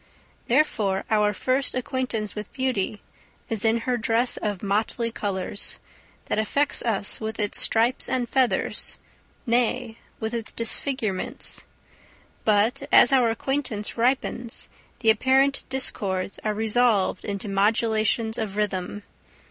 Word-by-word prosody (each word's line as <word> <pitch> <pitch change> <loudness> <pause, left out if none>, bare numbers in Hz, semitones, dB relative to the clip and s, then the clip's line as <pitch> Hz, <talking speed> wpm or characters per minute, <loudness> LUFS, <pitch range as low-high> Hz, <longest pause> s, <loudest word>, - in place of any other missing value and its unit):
Therefore 215 -8 +1
our 210 -1 +3
first 255 +6 0
acquaintance 255 -4 -2
with 210 -1 -7
beauty 235 -6 -1 0.5
is 220 -3 -2
in 225 +1 +2
her 250 +1 0
dress 230 +2 +1
of 205 -3 -3
motley 220 +3 0
colours, 200 -2 -3 0.5
that - - -1
affects 280 +7 0
us 215 -3 0
with 220 +1 -4
its 205 -1 +1
stripes 230 +3 +3
and 245 -2 0
feathers, 260 0 0 0.5
nay, 240 -1 0 0.2
with 220 +1 -3
its 230 -2 +1
disfigurements. 230 -3 -2 0.8
But 215 +2 +2
as 245 - +7
our 250 -3 +4
acquaintance 230 -2 -2
ripens, 240 -1 0 0.3
the 225 -2 +6
apparent 265 +5 +2
discords 200 -8 -1
are 215 -1 -1
resolved 220 -3 +2
into 200 +1 -4
modulations 220 +2 +1
of 210 -2 -3
rhythm. 205 -1 -2
225 Hz, 120 wpm, -25 LUFS, 210-250 Hz, 0.8 s, as